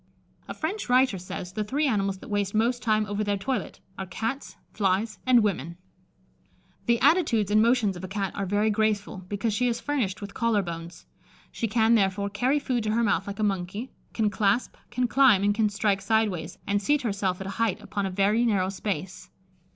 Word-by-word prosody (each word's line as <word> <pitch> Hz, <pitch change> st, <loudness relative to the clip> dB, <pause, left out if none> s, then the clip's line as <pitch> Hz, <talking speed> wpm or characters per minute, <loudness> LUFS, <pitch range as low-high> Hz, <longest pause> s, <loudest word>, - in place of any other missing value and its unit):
A -, -, -6 dB
French 355 Hz, +1 st, -3 dB
writer 250 Hz, -6 st, +3 dB
says, 180 Hz, 0 st, -7 dB
the 215 Hz, -, -1 dB
three 280 Hz, +9 st, 0 dB
animals 200 Hz, -6 st, 0 dB
that -, -, -12 dB
waste 205 Hz, -1 st, -1 dB
most 240 Hz, +3 st, +1 dB
time 215 Hz, -2 st, +2 dB
over 205 Hz, 0 st, -2 dB
their 205 Hz, -1 st, 0 dB
toilet 250 Hz, +7 st, -3 dB, 0.2 s
are 190 Hz, -, -4 dB
cats, 225 Hz, +9 st, -4 dB, 0.2 s
flies, 205 Hz, +2 st, 0 dB
and 245 Hz, -3 st, +6 dB
women. 170 Hz, -5 st, -2 dB, 1.1 s
The 235 Hz, 0 st, +3 dB
attitudes 235 Hz, -, +3 dB
and 215 Hz, +1 st, +5 dB
motions 230 Hz, -4 st, +3 dB
of 175 Hz, -, -9 dB
a -, -, -4 dB
Cat 195 Hz, 0 st, -3 dB
are 195 Hz, -, -2 dB
very 205 Hz, +3 st, +2 dB
graceful, 210 Hz, -1 st, 0 dB
because 205 Hz, +2 st, -1 dB
she 250 Hz, +4 st, +1 dB
is 235 Hz, -1 st, -1 dB
furnished 245 Hz, -10 st, -1 dB
with 205 Hz, -2 st, -8 dB
collar 230 Hz, -4 st, +1 dB
bones. 170 Hz, 0 st, -8 dB, 0.5 s
She 230 Hz, -, -2 dB
can, 225 Hz, +1 st, +3 dB
therefore, 200 Hz, -1 st, +1 dB
carry 250 Hz, +8 st, +1 dB
food 255 Hz, -5 st, -1 dB
to 215 Hz, -, 0 dB
her 235 Hz, +1 st, +2 dB
mouth 200 Hz, -3 st, +1 dB
like 200 Hz, -, -5 dB
a 215 Hz, -, -1 dB
monkey, 200 Hz, +4 st, -2 dB, 0.2 s
can 215 Hz, -2 st, 0 dB
clasp, 205 Hz, +4 st, +1 dB
can 245 Hz, +1 st, 0 dB
climb, 250 Hz, -7 st, +5 dB
and 205 Hz, 0 st, +3 dB
can 215 Hz, 0 st, +2 dB
strike 205 Hz, -1 st, 0 dB
sideways, 200 Hz, -6 st, 0 dB
and 200 Hz, 0 st, 0 dB
seat 290 Hz, +6 st, +1 dB
herself 195 Hz, -4 st, -1 dB
at 190 Hz, -, -6 dB
a -, -, -4 dB
height 225 Hz, -5 st, +1 dB
upon 200 Hz, -2 st, -3 dB
a -, -, -3 dB
very 200 Hz, +5 st, +2 dB
narrow 200 Hz, -5 st, +1 dB
space. 190 Hz, -2 st, -5 dB
210 Hz, 200 wpm, -26 LUFS, 195-230 Hz, 1.1 s, and